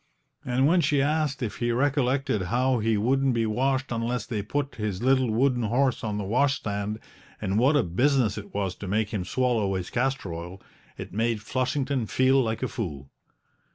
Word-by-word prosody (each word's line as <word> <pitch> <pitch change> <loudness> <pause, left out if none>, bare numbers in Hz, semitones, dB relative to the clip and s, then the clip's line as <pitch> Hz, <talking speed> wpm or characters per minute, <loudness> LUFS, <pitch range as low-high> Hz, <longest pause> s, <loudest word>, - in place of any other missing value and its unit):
And 130 +1 +1
when 170 +4 +4
she 145 -3 +2
asked 145 -2 0
if 110 - -4
he 120 0 0
recollected 135 -2 +1
how 125 +2 +2
he 110 0 +1
wouldn't 130 +4 +2
be 115 -1 +1
washed 130 +4 0
unless 115 -1 -2
they 110 -4 -3
put 140 +6 -3
his 105 -3 -3
little 130 -1 +3
wooden 125 +2 +2
horse 125 +4 +1
on 105 -2 -2
the 105 - -2
washstand, 105 -3 0 0.4
and 95 +3 0
what 135 +5 +4
a 145 - +4
business 120 - +2
it 100 -1 -8
was 100 -3 -2
to 100 - -7
make 105 +2 0
him 100 -4 -1
swallow 110 -2 0
his 90 -2 -4
castor 130 -7 -1
oil, 85 +3 -7 0.4
it - - -8
made 115 +1 0
Flushington 130 0 -1
feel 130 +3 +3
like 115 0 -2
a - - +1
fool. 75 - -6
120 Hz, 185 wpm, -26 LUFS, 105-135 Hz, 0.4 s, when